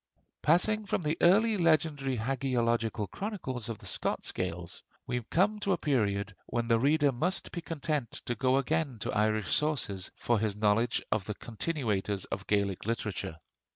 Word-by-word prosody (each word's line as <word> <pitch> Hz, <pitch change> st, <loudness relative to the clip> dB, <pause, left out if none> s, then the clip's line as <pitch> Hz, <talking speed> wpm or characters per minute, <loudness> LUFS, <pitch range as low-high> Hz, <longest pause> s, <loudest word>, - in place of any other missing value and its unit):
Passing 210 Hz, +6 st, +3 dB
from 190 Hz, -, 0 dB
the 150 Hz, +1 st, +1 dB
early 210 Hz, +5 st, +5 dB
legendary 155 Hz, -6 st, +2 dB
hagiological 115 Hz, -3 st, 0 dB
chronicles 130 Hz, -, -4 dB
of 115 Hz, -, -4 dB
the -, -, -15 dB
Scots -, -, -1 dB
Gaels, 85 Hz, 0 st, -4 dB, 0.2 s
we 125 Hz, -, -1 dB
come 210 Hz, +5 st, +2 dB
to 200 Hz, -2 st, +1 dB
a -, -, +1 dB
period 105 Hz, -9 st, 0 dB
when 120 Hz, -1 st, -1 dB
the 115 Hz, -1 st, +4 dB
reader 145 Hz, +2 st, +4 dB
must 160 Hz, +10 st, -1 dB
be 175 Hz, -, -4 dB
content 150 Hz, -6 st, -2 dB
to 120 Hz, -, -1 dB
go 130 Hz, +3 st, +2 dB
again 145 Hz, -1 st, 0 dB
to -, -, -2 dB
Irish 110 Hz, -2 st, +1 dB
sources 125 Hz, -11 st, 0 dB
for 120 Hz, -2 st, +1 dB
his 105 Hz, -1 st, -1 dB
knowledge 110 Hz, +3 st, +2 dB
of 105 Hz, -3 st, +1 dB
the 105 Hz, -, -4 dB
continuators 105 Hz, -6 st, -2 dB
of 95 Hz, -, -4 dB
Gaelic 100 Hz, -1 st, 0 dB
literature. 110 Hz, -7 st, -2 dB
125 Hz, 160 wpm, -30 LUFS, 110-155 Hz, 0.2 s, early